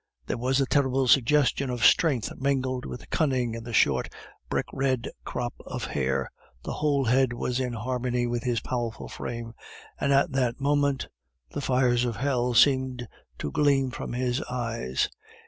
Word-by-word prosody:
There - - -2
was 130 +3 +1
a 135 - +3
terrible 135 -1 +2
suggestion 135 +1 +3
of 120 -3 0
strength 135 -8 +4
mingled 130 -2 -1
with 125 - -9
cunning 130 -7 +1
in 115 0 -6
the 120 - -7
short, 70 - +3 0.4
brick - - 0
red 130 -3 0
crop 120 -1 -3
of - - -5
hair, 65 -1 -1 0.3
the - - -4
whole 145 -3 +1
head 125 +1 +3
was 125 +1 -2
in 125 -2 -2
harmony 125 +1 -1
with 120 0 -1
his 120 -2 -1
powerful 120 -3 -3
frame, 115 -1 -6 0.5
and 140 - +1
at 140 +3 +3
that 125 -3 0
moment 140 -1 +1 0.4
the 145 - -4
fires 125 -2 +2
of 120 -3 -1
hell 125 0 0
seemed 130 -1 +3 0.3
to 75 - -4
gleam 140 -3 +2
from - - -5
his 125 +2 0
eyes. 115 - -1
125 Hz, 165 wpm, -27 LUFS, 120-135 Hz, 0.5 s, strength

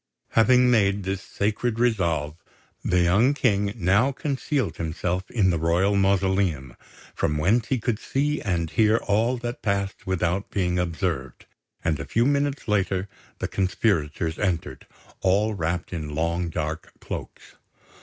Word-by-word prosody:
Having 125 +2 +5
made 100 -3 +2
this 95 0 -3
sacred 110 +4 -1
resolve, 85 -11 +1 0.5
the 90 0 +2
young 105 +11 +3
King 100 -6 +1
now 105 +6 +3
concealed 140 -2 -2
himself 85 +3 -2
in 95 -6 +2
the 85 - 0
royal 85 +5 +2
mausoleum, 95 -9 +1 0.4
from 75 - 0
whence 110 +10 +2
he 130 - +1
could 115 -2 -1
see 145 +4 -1
and 85 -5 -1
hear 110 0 +4
all 115 +4 +1
that 120 0 -5
passed 100 -1 -2
without 95 +1 -1
being 90 -2 0
observed; 85 -6 -3 0.4
and 80 -3 +1
a 70 - -4
few 115 +10 +1
minutes 145 0 0
later 100 -2 0 0.3
the - - -2
conspirators 85 -5 0
entered, 90 -5 -2 0.3
all 100 +3 +2
wrapped 85 -1 -3
in 75 -3 -4
long 85 +2 -1
dark 80 0 -4
cloaks. - - -8
95 Hz, 140 wpm, -25 LUFS, 85-110 Hz, 0.5 s, Having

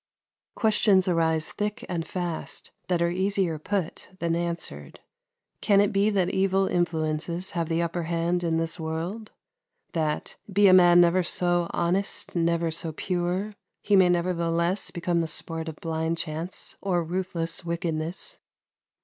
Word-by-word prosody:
Questions 210 -4 +3
arise 160 -2 +1
thick 210 0 -3
and 170 -3 -3
fast 175 -3 -5 0.2
that 175 -2 +1
are 170 - +1
easier 190 -3 0
put 185 +1 -3
than 170 -2 0
answered. 170 0 -4 0.6
Can 200 -2 +4
it 205 +1 +3
be 200 +2 +3
that 190 -4 +1
evil 195 0 +2
influences 170 0 -1
have 170 -2 -2
the 165 +1 +1
upper 170 +1 -2
hand 170 +1 -1
in 165 -1 +1
this 165 +1 -1
world? 170 +7 -4 0.6
that, 155 -2 -2
be 200 +1 +5
a 185 - +7
man 175 -1 +7
never 175 +2 +4
so 175 0 +1
honest, 180 +4 -1
never 170 -1 +1
so 160 0 -2
pure, 180 +5 -2 0.3
he 205 - +3
may 185 -2 +6
nevertheless 170 +1 0
become 175 -1 -1
the 165 - -2
sport 160 +1 0
of 160 - -7
blind 160 +1 -2
chance 160 +3 -4
or 180 -3 0
ruthless 170 -1 -2
wickedness? 170 - -3
175 Hz, 145 wpm, -26 LUFS, 165-185 Hz, 0.6 s, a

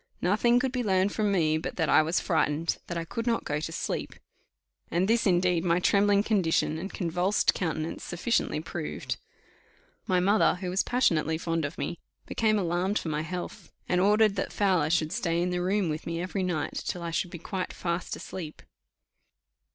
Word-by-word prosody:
Nothing 235 +6 +3
could 260 0 -1
be 250 -1 -1
learned 190 -1 +2
from 210 -1 0
me 160 -5 +2
but - - -5
that 160 - 0
"I - - +6
was 160 +3 +1
frightened," 160 -2 0
that 170 - -3
"I 165 - -3
could 230 +7 -4
not 230 -1 +1
go 145 0 -2
to 160 +1 -4
sleep;" - - -3 0.7
and 175 +3 +1
this, 230 0 +3
indeed, 180 -2 +2
my 175 -1 +2
trembling 200 +2 +3
condition, 170 -7 +1
and 195 +4 -5
convulsed 180 +3 +1
countenance, 160 -2 -3
sufficiently 175 -2 0
proved. 160 -1 -4 0.9
My 185 -1 +3
mother, 200 +4 +3
who 180 0 -4
was 190 - +2
passionately 165 -10 +1
fond 165 -1 -1
of 145 - -6
me, 175 - -4 0.3
became 215 -1 +1
alarmed 185 +2 0
for 165 - -3
my 150 0 -1
health, 175 +2 -6 0.2
and 180 0 +2
ordered 210 +1 +4
that 195 - -2
Fowler 185 -7 +2
should 160 -1 +1
stay 170 -6 0
in 180 +1 0
the 180 0 -1
room 190 +1 +1
with 155 0 -4
me 165 0 -2
every 185 +2 -2
night 175 -5 -2
till 175 - -4
I 170 - -3
should 175 +2 -1
be 170 - -7
quite 185 +3 -4
fast 170 0 -3
asleep. 160 -5 -8
180 Hz, 190 wpm, -28 LUFS, 165-200 Hz, 0.9 s, I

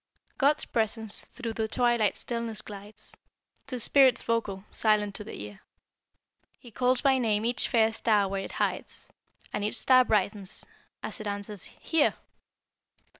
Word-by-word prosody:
God's 290 +2 +3
presence 220 -1 -1
through 235 -3 -6
the 220 0 -2
twilight 240 -3 +1
stillness 230 -3 -3
glides, 210 +1 -10 0.5
To 255 - -4
spirits 260 +1 +4
vocal 210 -4 -2
silent 210 -2 +1
to 210 - -6
the 215 - -9
ear; 105 -1 -8 1.0
He 240 - -15
calls 250 +3 +2
by 270 -2 +3
name 220 -3 +1
each 240 +1 +3
fair 225 -1 +3
star 215 -3 +2
where 195 0 -3
it - - -8
hides, - - -3 0.4
And 210 - -2
each 210 - +2
star 255 -1 +6
brightens, 205 -3 -1 0.4
as - - -4
it - - -5
answers 205 -1 -5
'Here!' 325 -3 0
220 Hz, 145 wpm, -28 LUFS, 205-240 Hz, 1.0 s, star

